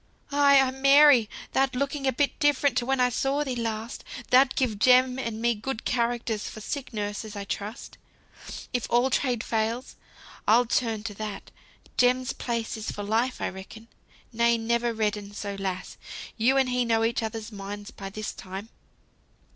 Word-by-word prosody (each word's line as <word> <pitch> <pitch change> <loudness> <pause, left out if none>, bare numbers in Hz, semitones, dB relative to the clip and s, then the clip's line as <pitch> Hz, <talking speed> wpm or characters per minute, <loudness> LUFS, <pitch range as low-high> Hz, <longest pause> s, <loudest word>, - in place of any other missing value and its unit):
"Ay, 280 -1 +6
ay, 265 -1 +3
Mary! 275 -3 +6 0.2
thou'rt 265 -1 +2
looking 275 +1 -1
a - - +4
bit 280 +3 0
different 290 -3 +3
to 245 -1 0
when 270 0 +1
I 250 0 +4
saw 270 +4 0
thee 260 -3 -3
last. 225 -1 -4 0.3
Thou'lt 260 +1 +5
give 230 -6 0
Jem 255 +2 +5
and 230 -4 -4
me 235 +1 +2
good 225 +2 -5
characters 235 -3 -1
for - - -9
sick 270 +5 -5
nurses, 210 0 -4
I 200 - -4
trust. 205 +3 -6 0.7
If 245 -2 -1
all 245 +3 +3
trades 245 -3 0
fail, 225 +3 -1 0.6
I'll 235 +3 +5
turn 225 -2 0
to 220 -2 -5
that. 210 0 -7 0.5
Jem's 255 +1 +3
place 230 -2 -3
is 220 - -5
for 205 - -5
life, 230 +5 0
I - - 0
reckon. 220 +4 -11 0.4
Nay, 235 +1 +3
never 235 +1 0
redden 210 -2 -2
so, 200 -1 -4
lass. 185 -2 -4 0.4
You 250 +4 +3
and 265 -1 +3
he 250 0 +1
know 225 -1 +2
each 230 +1 +1
other's 225 0 -5
minds 205 0 -7
by 195 -1 -8
this 215 +2 -5
time!" 195 +4 -8
235 Hz, 170 wpm, -26 LUFS, 215-255 Hz, 0.7 s, Ay